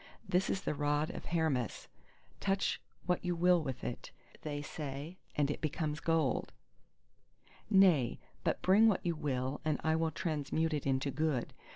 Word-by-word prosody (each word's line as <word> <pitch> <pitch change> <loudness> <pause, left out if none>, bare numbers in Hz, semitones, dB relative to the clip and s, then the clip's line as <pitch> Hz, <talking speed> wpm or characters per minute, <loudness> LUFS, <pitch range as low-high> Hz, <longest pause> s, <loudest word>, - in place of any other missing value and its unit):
This 185 0 +2
is 195 - 0
the - - -1
rod 145 +1 0
of - - -8
Hermes; 155 -8 -1 0.5
touch 195 0 0 0.2
what 180 -1 0
you 180 -1 0
will 175 0 +4
with 135 -5 -5
it, - - -5 0.3
they 145 -1 -4
say, 145 +4 -6 0.2
and 145 -1 +2
it - - -5
becomes 150 -1 -1
gold. 160 -5 +1 1.2
Nay, 185 - +5 0.3
but - - 0
bring 205 +4 +6
what 205 -5 +2
you 170 - +2
will 135 -2 -2
and 155 -1 0
I 160 0 +3
will 160 0 +1
transmute 160 0 -1
it 145 -2 -2
into 135 +1 +1
Good. 145 -3 -1
155 Hz, 160 wpm, -34 LUFS, 145-175 Hz, 1.2 s, bring